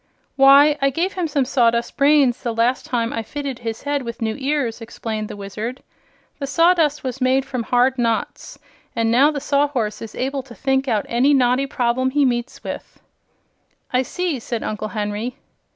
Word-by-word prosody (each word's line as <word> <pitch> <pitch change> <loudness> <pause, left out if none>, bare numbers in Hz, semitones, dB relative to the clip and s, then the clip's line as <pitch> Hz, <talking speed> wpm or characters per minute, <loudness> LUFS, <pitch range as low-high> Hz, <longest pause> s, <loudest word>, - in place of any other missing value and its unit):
"Why, 280 +2 +6
I 275 - +4
gave 340 +8 -1
him 360 -3 -2
some 280 -3 0
sawdust 235 -2 +1
brains 280 -3 +3
the 235 -2 -3
last 240 +3 +1
time 235 -2 -1
I 225 - -2
fitted 275 +2 -5
his 225 -1 -5
head 285 0 -1
with 235 -2 -7
new 220 -1 -1
ears," 270 -5 -1
explained 220 -1 -5
the - - -8
Wizard. 215 +6 -6 0.6
"The 275 - -3
sawdust 330 -1 +3
was 260 0 -5
made 260 +1 +2
from 255 -3 -3
hard 250 +2 +2
knots, 230 -2 -2 0.4
and 230 -1 +1
now 265 +5 +5
the 300 -2 -3
Sawhorse 280 -6 0
is 225 -1 -8
able 270 +2 -2
to 250 -2 -14
think 270 0 0
out 220 -5 0
any 265 +5 +3
knotty 255 +1 +2
problem 255 0 0
he 285 +1 +2
meets 240 0 -2
with." - - -7 0.9
"I 250 - +3
see," 330 +2 -2
said 230 0 -4
Uncle 215 0 -3
Henry. 210 +3 -3
255 Hz, 180 wpm, -21 LUFS, 230-280 Hz, 0.9 s, Why